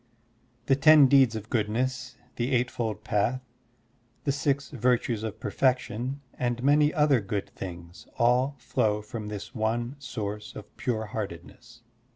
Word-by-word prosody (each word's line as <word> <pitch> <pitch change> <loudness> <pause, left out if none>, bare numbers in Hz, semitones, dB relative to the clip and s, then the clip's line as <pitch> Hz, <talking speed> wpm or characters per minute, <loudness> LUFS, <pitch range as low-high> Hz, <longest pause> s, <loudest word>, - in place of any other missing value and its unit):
The 135 - +4
ten 150 +1 +7
deeds 130 -4 +5
of 110 +1 -7
goodness, 125 +3 -1 0.2
the 125 +3 -1
eightfold 120 -3 -1
path, 110 +4 0 0.8
the 140 - +1
six 140 -1 -1
virtues 120 -3 +1
of 110 0 -5
perfection, 125 +3 -1
and 120 -1 -2
many 150 +2 +4
other 150 -4 +3
good 100 0 -4
things 85 -1 -9
all 125 +4 +3
flow 105 -4 0
from 105 0 -6
this 105 -2 -7
one 120 +3 -1
source 105 -5 -5
of 105 - -11
pure 110 -3 -2
heartedness. 110 +4 -8
120 Hz, 135 wpm, -27 LUFS, 105-130 Hz, 0.8 s, ten